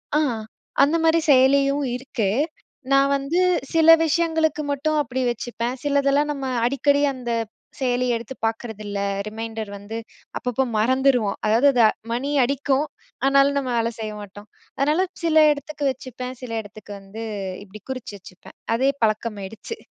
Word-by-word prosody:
ஆ, - - +5 0.6
அந்த 300 +4 +3
மாரி 325 0 +4
செயலியும் 275 +2 +4
இருக்கு. 250 -5 -2 0.6
நான் 275 0 +5
வந்து, 280 +6 -1 0.3
சில 325 -1 +4 0.2
விஷயங்களுக்கு 320 -1 +1
மட்டும் 305 +2 0
அப்படி 260 -2 -3
வச்சுப்பேன். 240 +1 -3
சிலதெல்லாம் 285 +1 +2
நம்ம 275 -2 -4 0.2
அடிக்கடி 280 +2 +2
அந்த 245 -2 -5 0.5
செயலி 250 -1 +1
எடுத்து 235 +3 -6
பாக்குறதில்ல. 215 -3 -4 0.3
ரிமைண்டர் 220 -1 -5
வந்து 205 +3 -7 0.4
அப்பப்போ 250 +1 -1
மறந்துருவோம். 250 -2 +2
அதாவது 235 +7 +4
த - - +7 0.3
மணி 270 +5 -1
அடிக்கும். 280 +2 +1 0.4
ஆனாலும் 275 +1 +4
நம்ம 260 -2 -3
வேலை 230 0 +1
செய்ய 215 -1 -4
மாட்டோம். 205 +1 -12 0.3
அதனால 305 +7 +2 0.2
சில 315 -2 +5
இடத்துக்கு 290 0 -4
வச்சுப்பேன். 255 0 -7
சில 245 - -6
இடத்துக்கு 205 0 -11
வந்து 195 +3 -9 0.4
இப்டி 210 +1 -12
குறிச்சு 255 -5 -6
வச்சுப்பேன். 185 0 -15 0.2
அதே 265 +4 +2
பழக்கமாயிடுச்சு. 215 - -2
260 Hz, 135 wpm, -23 LUFS, 225-280 Hz, 0.6 s, த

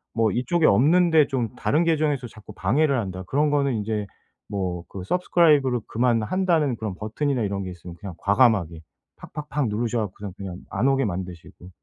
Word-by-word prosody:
뭐 110 -3 +2
이쪽에 155 - +1
없는데 160 - +5
좀 125 -4 -2
다른 155 +6 +1
계정에서 150 -6 0
자꾸 110 -1 -13
방해를 140 +4 +1
한다. 95 -4 -4
그런 150 +2 +1
거는 140 -3 +1
인제 105 -1 -2 0.4
뭐 90 -4 -3
그 95 - -7
Subscribe를 145 - +2
그만한다는 125 - +1
그런 105 -4 -4
버튼이나 125 +5 -2
이런 100 -1 -2
게 95 - -6
있으면 85 0 -10
그냥 95 -5 -8
과감하게 100 -7 +2 0.4
팍팍팍 150 -3 -4
누르셔 115 +2 -1
갖고서 100 -1 -5
그냥, 95 -2 -6
그냥 - - -9
안 115 +8 +1
오게 135 0 +2
만드시고 90 -1 -7
115 Hz, 415 characters per minute, -24 LUFS, 100-145 Hz, 0.4 s, 없는데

